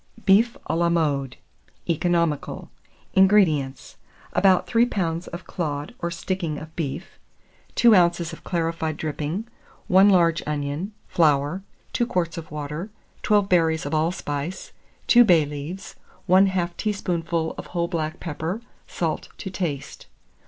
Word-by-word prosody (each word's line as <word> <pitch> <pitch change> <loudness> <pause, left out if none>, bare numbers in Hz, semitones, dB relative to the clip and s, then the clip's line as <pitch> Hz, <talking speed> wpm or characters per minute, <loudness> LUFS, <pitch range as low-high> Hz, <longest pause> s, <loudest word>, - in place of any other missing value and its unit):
BEEF 230 +6 +4
A 160 - -1
LA 170 0 +2
MODE. 145 -6 0 0.5
(Economical.) 170 -2 0 0.4
601. 190 - +6
INGREDIENTS. 155 -10 +2 0.4
About 190 -2 +4
3 235 0 +3
lbs. 170 -5 -2
of 170 +2 -8
clod 145 -4 -4
or 170 - -2
sticking 170 -2 -3
of 160 +1 -10
beef, 160 +2 -5 0.6
2 235 -3 +6
oz. 170 -2 +2
of - - -11
clarified 165 -2 -2
dripping, 155 +6 -3 0.4
1 190 +1 +7
large 170 -4 +4
onion, 150 +6 -3 0.2
flour, 150 +2 +2 0.3
2 240 - +1
quarts 170 -6 -1
of 160 - -10
water, 150 +6 -5 0.3
12 205 -2 +3
berries 165 -4 +2
of 145 - -4
allspice, 155 +1 -2 0.3
2 240 0 +7
bay 170 -8 +5
leaves, 150 +6 -7 0.3
1/2 185 -2 +3
teaspoonful 170 -5 -1
of - - -8
whole 170 -1 -1
black 160 -3 -3
pepper, 165 +5 -4 0.3
salt - - -3
to 190 - -6
taste. 150 -7 -4
170 Hz, 130 wpm, -24 LUFS, 155-190 Hz, 0.6 s, 1